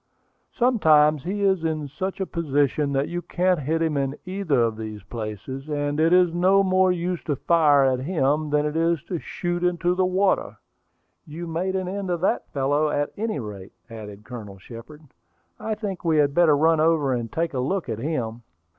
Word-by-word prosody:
Sometimes 155 - +4
he 200 +3 -2
is 190 -4 +2
in 155 -2 -2
such 185 +8 -5
a 190 - -1
position 145 -3 0
that 135 +1 0
you 175 0 -4
can't 180 +1 0
hit 160 +4 -1
him 155 -3 0
in 135 0 -1
either 185 -7 0
of 115 -1 0
these 110 -2 -7
places, 115 +6 -6
and 145 0 -1
it 165 +1 +3
is 180 -2 +4
no 190 +3 +4
more 185 -1 +3
use 180 0 -2
to 145 - 0
fire 150 -2 +4
at 130 -1 +1
him 150 0 0
than 150 0 +1
it 150 +1 -2
is 165 -2 +1
to 170 0 -4
shoot 175 +2 -3
into 175 0 +1
the 185 +1 +1
water." 190 +1 0 0.7
"You 160 +3 -7
made 175 +3 -2
an 185 -1 -2
end 195 0 -4
of 175 -1 -1
that 190 - 0
fellow, 145 +2 +1
at 145 0 -1
any 215 -7 -2
rate," 100 -5 -8 0.2
added 105 -2 -9
Colonel 105 -5 -9
Shepard. 120 +10 -12 0.6
"I 220 - -3
think 205 -4 -5
we 165 -2 +2
had 145 -2 +3
better 160 -2 +4
run 160 +1 +3
over 155 -4 +2
and 120 -2 -3
take 165 -1 -2
a 130 - -2
look 175 +9 -1
at 115 -2 -4
him." 120 -5 -3
155 Hz, 195 wpm, -24 LUFS, 135-180 Hz, 0.7 s, Sometimes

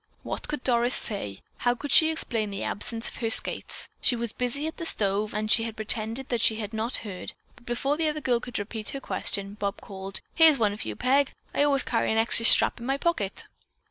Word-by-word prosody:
What - - -4
could 295 -3 -4
Doris 240 0 +2
say? 105 - 0 0.2
How 245 0 +1
could 290 +3 -6
she 315 - +7
explain 230 -9 -2
the 195 -1 -5
absence 225 +2 0
of - - -7
her 225 - -1
skates? - - +1
She 245 - +3
was 235 -2 -3
busy 250 +4 -1
at 320 - -5
the 335 - -5
stove 205 -2 +1
and 215 +1 -2
she 225 -1 +3
pretended 220 +3 -3
that 240 -3 0
she 220 - +4
had 215 0 -5
not 220 +3 -1
heard, 190 -4 -5 0.2
but 240 - -21
before 270 +4 -1
the 320 -1 +1
other 305 0 -3
girl 250 -5 +1
could 245 0 -4
repeat 215 +1 -4
her - - -6
question, 200 -6 -4
Bob 200 +1 -2
called: 195 -1 -7
"Here's 320 -3 +6
one 210 -4 +1
for 215 - -7
you, - - -4
Peg. 270 +2 +2 0.2
I - - +1
always 280 -2 +4
carry 230 - 0
an 220 - +1
extra 225 0 +2
strap - - +5
in 235 - -8
my 270 +1 +1
pocket." 280 - -1
230 Hz, 225 wpm, -26 LUFS, 210-265 Hz, 0.2 s, she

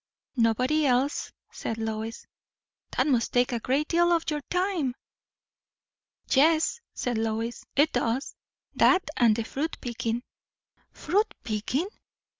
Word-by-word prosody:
"Nobody 255 +7 +3
else," 260 +3 +1 0.2
said 225 - -4
Lois. 220 0 -4 0.7
"That - - +4
must 250 -6 +1
take 245 0 +3
a 240 - -1
great 270 +6 0
deal 345 +1 +3
of 335 -1 +3
your 300 -1 -2
time!" 360 -8 0 1.3
"Yes," 320 - +3
said 240 -3 -1
Lois, 225 +1 -2
"it 295 +3 +4
does; 245 +2 -1 0.4
that 370 - +5
and 230 -3 +4
the 230 - -1
fruit 295 +8 -3
picking." 235 -1 -3 0.7
"Fruit 415 +4 0
picking! 225 - -1
255 Hz, 120 wpm, -27 LUFS, 230-310 Hz, 1.3 s, that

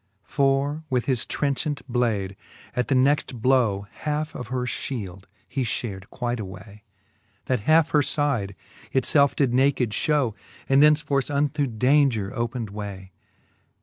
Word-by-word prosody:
For 140 +3 +1
with 125 -3 0
his 130 -3 0
trenchant 145 +1 -1
blade 110 -6 0 0.4
at 125 - 0
the 135 - +2
next 130 -1 +2
blow 110 -5 +2
Halfe 150 +1 -2
of 125 - -6
her 125 0 -2
Ihield 100 -7 -5 0.2
he 135 - -3
fliared 100 -2 -4
quite 120 -1 -3
away, 100 +1 -9 0.6
That 125 -5 -1
halfe 160 0 +5
her 150 - +4
fide 135 -10 0 0.4
it 130 - +1
felfe 140 -2 +3
did 135 -4 +1
naked 130 -3 +2
Ihow, 140 0 +1 0.3
And 135 +1 +5
thenceforth 150 -3 +3
unto 145 0 0
daunger 125 -3 +2
opened 120 -3 -3
way. 100 -2 -7
130 Hz, 140 wpm, -24 LUFS, 110-140 Hz, 0.6 s, halfe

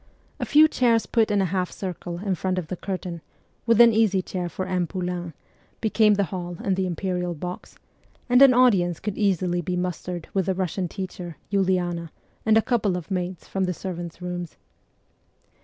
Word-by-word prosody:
A - - -1
few 310 +1 +7
chairs 235 -6 +2
put 225 -2 +2
in 205 -1 +2
a 185 -1 -2
half 185 -2 0
circle 175 -2 -5
in 195 +1 -1
front 185 +1 -1
of 170 -4 -3
the 185 - -2
curtain, 180 -2 -5 0.5
with 230 -1 +4
an 235 -1 +8
easy 210 -4 +3
chair 180 -2 -4
for 185 - -4
M. 180 -2 -1
Poulain, 180 -3 -4 0.4
became 215 -1 +3
the 200 - +2
hall 175 -1 -4
and 195 - +1
the 190 0 0
imperial 180 0 -2
box, 180 +4 -7 0.5
and 250 +1 +5
an 275 -1 +9
audience 200 -10 +3
could 205 -1 -4
easily 180 -3 +1
be 180 +2 -2
mustered 180 -1 -4
with 190 -3 0
the 190 - +1
Russian 185 0 -2
teacher, 180 -3 -7
Uliana, 180 -4 0 0.4
and 220 0 +6
a 225 - +4
couple 210 -7 +1
of 180 +3 -8
maids 180 -1 -3
from 190 -1 -1
the 180 -1 -2
servants' 175 -1 -6
rooms. 175 -2 -5
185 Hz, 185 wpm, -24 LUFS, 175-205 Hz, 0.5 s, an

